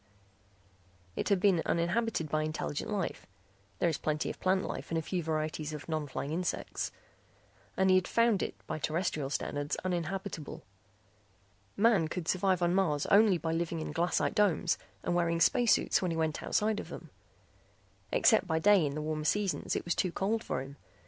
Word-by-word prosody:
It - - -2
had 200 -2 +3
been 185 -3 +3
uninhabited 175 +1 0
by 155 +1 0
intelligent 155 -1 -3
life 200 -4 -3 0.5
(there - - +1
is 160 - -1
plenty 150 -1 -1
of - - -12
plant 185 0 +2
life - - -5
and 165 - -1
a - - +1
few 180 +2 -2
varieties 155 -1 -2
of 150 - -7
non 155 -2 -2
flying 140 +1 -4
insects) 175 +2 -2 0.9
and 190 - +3
he 185 - +6
had 185 - 0
found 230 -4 +3
it - - -3
by - - -4
terrestrial 155 -3 -1
standards 145 0 -2
uninhabitable. 180 -2 -3 1.1
Man 205 -6 +4
could 165 +1 -5
survive 185 -1 +2
on 175 0 +2
Mars 165 -7 +1
only 205 -2 +6
by 160 0 -3
living 165 0 -2
inside 155 - -5
glassite 175 +2 +1
domes 195 -5 +2 0.2
and - - 0
wearing 170 -1 +1
space 235 +7 +4
suits - - +2
when 185 - 0
he 165 - -2
went 160 -2 -1
outside 215 0 0
of - - -7
them. - - -9 1.0
Except 220 -5 +4
by 160 -2 +1
day 195 +2 +5
in 145 -1 -1
the 150 - -3
warmer 155 0 -2
seasons 195 +4 0
it - - -3
was 175 - +1
too 185 - 0
cold 215 +6 -1
for 130 - -2
him. 140 +1 -11
170 Hz, 180 wpm, -31 LUFS, 155-195 Hz, 1.1 s, he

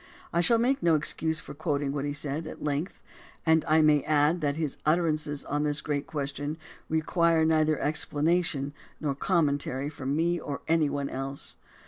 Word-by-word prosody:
I 170 - +3
shall 230 +7 +4
make 255 +4 +1
no 170 -2 +4
excuse 160 +1 0
for - - -9
quoting 145 -2 -1
what 145 -1 -2
he 145 - -2
said, 150 +2 -3
at - - -8
length, 150 +5 -3 0.4
and 160 -1 +4
I 155 0 +5
may 150 -1 +5
add 155 +3 +3
that 145 -1 0
his 155 -3 -3
utterances 155 -2 0
on 145 +1 -1
this 150 0 +1
great 145 -1 -2
question 145 0 -4 0.3
require 160 +1 +2
neither 155 -1 +2
explanation 150 -1 0 0.3
nor 145 -3 -1
commentary 145 -4 0
from 140 -1 -3
me 170 +2 +1
or 145 -3 -5
any 160 -2 +3
one 140 -1 -2
else. 135 +1 -3
150 Hz, 170 wpm, -28 LUFS, 145-160 Hz, 0.4 s, I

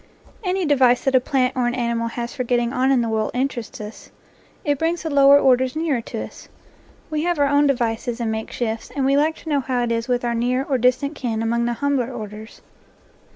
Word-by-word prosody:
Any 370 -1 0
device 260 -5 +3
that 270 - +1
a 260 - +6
plant 255 -1 0
or 250 -2 +1
an 240 - -1
animal 235 -1 -1
has 235 +2 -5
for 265 -3 -3
get 245 0 +1
ting 240 +1 -1
on 260 0 +1
in 260 -3 +3
the 230 - -1
world 220 -1 0
interests 250 -3 -3
us; 210 +1 -9 0.6
it 290 -2 +1
brings 330 +1 -1
the 320 - -3
lower 280 0 +7
orders 260 -1 +3
nearer 310 -6 0
to - - -5
us. - - -12 0.6
We 305 -1 -1
have 350 0 0
our 285 - +3
own 285 +1 +3
devices 240 -2 -1
and 230 -2 -1
NATURE 220 +2 -3
LORE 220 - 0
makeshifts, 225 - -15
and 275 -2 0
we 275 +1 +3
like 310 +3 +2
to 320 - -10
know 290 -2 +2
how 255 -2 -1
it 235 - -1
is 230 0 -1
with 245 -1 0
our 235 - 0
near 250 +3 0
or 270 -2 -1
distant 255 +4 +1
kin 230 -6 -3
among 235 +1 0
the 240 - 0
humbler 265 -1 -1
orders. 215 -2 -9
250 Hz, 240 wpm, -21 LUFS, 235-280 Hz, 0.6 s, lower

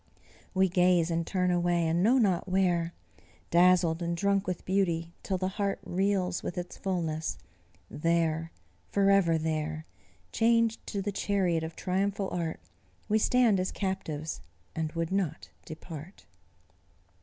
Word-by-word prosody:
We 190 0 +4
gaze 180 -1 +3
and 165 0 -1
turn 180 -2 +1
away, 175 -1 +1
and 165 +2 +1
know 235 +7 +4
not 195 -6 +1
where, 175 -3 +1 0.6
Dazzled 175 -1 +4
and 170 0 -2
drunk 200 +1 +1
with 180 -2 -3
beauty, 170 -3 0
till 190 - -2
the 185 +1 -1
heart 200 +1 -2
Reels 185 -1 0
with 175 - -5
its 180 0 -5
fulness; 160 - -2 0.5
there 165 0 0 0.4
forever 195 -4 +3
there 155 0 -2 0.5
Chained 230 0 +2
to 200 -2 -3
the 205 - -2
chariot 190 -4 0
of 160 +1 -6
triumphal 195 +1 -1
Art, 165 -2 -3 0.5
We 215 +1 +3
stand 235 -3 +3
as 185 - -1
captives, 165 -6 -3 0.3
and 160 -1 -2
would 165 0 -2
not 185 -6 -2 0.2
depart." 160 +2 -9
180 Hz, 135 wpm, -29 LUFS, 165-195 Hz, 0.6 s, We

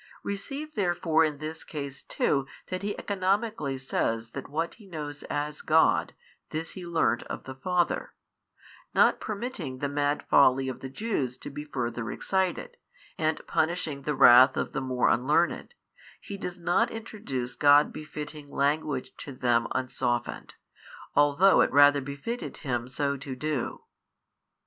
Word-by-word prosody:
Receive 275 +10 -4
therefore 175 -5 +2
in 155 -2 0
this 155 +2 -6
case 140 -3 -6
too 135 -1 0 0.2
that 185 - -3
He 205 0 -3
economically 195 - -1
says 115 -3 -2
that 135 0 -7
what 165 +3 -2
He 205 - -15
knows 150 -4 -6
as 150 0 -3
God, 160 +1 +3 0.3
this 160 +1 -4
He 180 -2 -8
learnt 165 -8 +1
of - - -6
the 130 - -7
Father; 175 +6 -1 0.8
not - - +5
permitting 200 - -5
the 140 - -2
mad 145 +1 -1
folly 135 -1 +5
of 130 - -6
the 130 - -7
Jews 135 - -2
to - - -8
be 150 +2 -6
further 120 -5 -3
excited, 190 - -1 0.4
and 155 -1 0
punishing 160 -3 -1
the 150 +2 -2
wrath 130 0 +8
of - - -2
the 135 - -1
more 130 -1 +1
unlearned, 150 - +1 0.4
He 200 - -7
does 180 -2 -5
not 180 +7 +2
introduce 140 - -5
God 145 0 +5
befitting 150 -1 -7
language 140 -1 -1
to 140 - -8
them 120 -2 +1
unsoftened, 125 -2 -2 0.6
although 145 +7 +5
it - - +2
rather 145 +1 +6
befitted 140 - -5
Him 120 -2 -1
so 140 +2 -1
to 135 -1 -6
do. 150 -1 -3
145 Hz, 145 wpm, -28 LUFS, 135-175 Hz, 0.8 s, wrath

